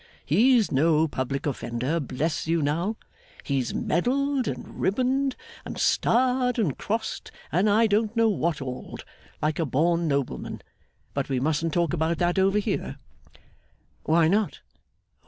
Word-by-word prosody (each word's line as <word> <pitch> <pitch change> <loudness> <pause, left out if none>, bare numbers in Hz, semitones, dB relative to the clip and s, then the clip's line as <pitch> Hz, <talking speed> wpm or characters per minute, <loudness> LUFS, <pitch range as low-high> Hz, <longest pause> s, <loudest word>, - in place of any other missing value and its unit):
He's 225 - +4
no 155 +3 +3
public 135 -1 -3
offender, 130 +2 -2
bless 150 +3 -2
you, 165 -1 +1
now! 170 +9 0 0.5
He's 135 -4 -1
medalled 265 - 0
and - - -6
ribboned, 260 +5 +1 0.3
and - - -7
starred 250 +1 +2
and 185 - +1
crossed, 220 +1 -3 0.2
and 185 +7 +2
I 220 +3 +4
don't 215 +1 +1
know 230 0 +4
what 170 -8 0
all'd, 130 -1 -7 0.4
like 155 +1 0
a 165 - +1
born 165 +5 +1
nobleman. 140 - -2 0.5
But - - -2
we 130 -2 0
mustn't 160 +4 0
talk 170 -1 +1
about 165 0 0
that 175 +2 +1
over 195 +2 +3
here.' 200 - -2 1.1
'Why 160 0 +3
not? 205 +4 0
170 Hz, 140 wpm, -26 LUFS, 150-220 Hz, 1.1 s, He's